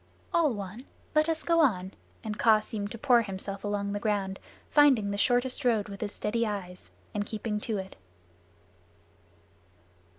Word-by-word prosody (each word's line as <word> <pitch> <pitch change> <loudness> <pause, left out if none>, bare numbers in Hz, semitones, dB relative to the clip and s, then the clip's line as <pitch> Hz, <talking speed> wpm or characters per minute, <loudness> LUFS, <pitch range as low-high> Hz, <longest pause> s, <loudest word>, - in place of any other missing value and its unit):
"All 330 -4 +4
one. 205 +5 -7 0.3
Let 310 +1 +3
us 320 -1 0
go 335 -1 +3
on," 190 - +2 0.3
and 215 -2 -5
Kaa 220 -2 +6
seemed 205 -1 -4
to 230 - -7
pour 245 0 +4
himself 195 -1 -5
along 205 -1 -1
the 205 - -2
ground, 200 -2 -1 0.3
finding 265 -9 +4
the - - -2
shortest 250 +5 +1
road 225 -5 +2
with 200 -1 -8
his 210 -2 -2
steady 230 +3 -1
eyes, 195 -4 -5 0.2
and 205 - -1
keeping 210 0 -3
to 215 0 -2
it. 190 0 -6
210 Hz, 160 wpm, -29 LUFS, 200-245 Hz, 0.3 s, Kaa